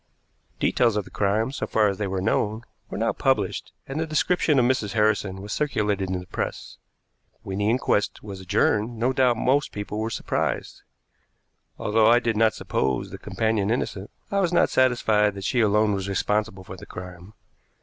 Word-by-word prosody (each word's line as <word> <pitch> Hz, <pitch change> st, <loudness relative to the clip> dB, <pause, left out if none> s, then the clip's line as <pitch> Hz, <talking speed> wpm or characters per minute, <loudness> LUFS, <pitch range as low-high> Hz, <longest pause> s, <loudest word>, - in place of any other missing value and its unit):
Details 120 Hz, -4 st, +2 dB
of 105 Hz, -2 st, -1 dB
the -, -, -14 dB
crime, 105 Hz, +5 st, 0 dB
so 140 Hz, -, -4 dB
far 110 Hz, -1 st, +3 dB
as 100 Hz, 0 st, -2 dB
they 105 Hz, -, -1 dB
were 95 Hz, -1 st, -2 dB
known, 110 Hz, +3 st, 0 dB, 0.3 s
were -, -, -5 dB
now -, -, +1 dB
published, -, -, 0 dB, 0.2 s
and 135 Hz, +3 st, -4 dB
the 160 Hz, -, -1 dB
description 155 Hz, -1 st, +2 dB
of 125 Hz, -, +4 dB
Mrs. 115 Hz, -6 st, 0 dB
Harrison 105 Hz, -3 st, +1 dB
was 105 Hz, -, -5 dB
circulated 105 Hz, -9 st, 0 dB
in 95 Hz, -1 st, -1 dB
the 90 Hz, -, -10 dB
press. -, -, -5 dB, 0.6 s
When 95 Hz, 0 st, -4 dB
the 105 Hz, +1 st, +1 dB
inquest 115 Hz, -4 st, 0 dB
was 100 Hz, -2 st, -8 dB
adjourned, 105 Hz, +5 st, +1 dB
no 125 Hz, +4 st, +1 dB
doubt 125 Hz, -3 st, +3 dB
most 140 Hz, +5 st, +1 dB
people 105 Hz, +1 st, -5 dB
were 110 Hz, +1 st, -1 dB
surprised. -, -, -2 dB, 1.0 s
Although 110 Hz, +1 st, +3 dB
I 120 Hz, +1 st, +7 dB
did 120 Hz, -2 st, 0 dB
not 110 Hz, 0 st, +3 dB
suppose 65 Hz, -2 st, -1 dB
the -, -, -8 dB
companion 110 Hz, -2 st, -1 dB
innocent, 105 Hz, -4 st, -2 dB, 0.2 s
I 200 Hz, -, +1 dB
was 180 Hz, -3 st, +1 dB
not 175 Hz, -, +3 dB
satisfied 110 Hz, -5 st, +3 dB
that 100 Hz, -, -7 dB
she 125 Hz, +6 st, 0 dB
alone 105 Hz, 0 st, +3 dB
was 95 Hz, 0 st, -3 dB
responsible 105 Hz, 0 st, -1 dB
for 95 Hz, -, -9 dB
the -, -, -12 dB
crime. 90 Hz, +2 st, -10 dB
105 Hz, 185 wpm, -25 LUFS, 100-120 Hz, 1.0 s, I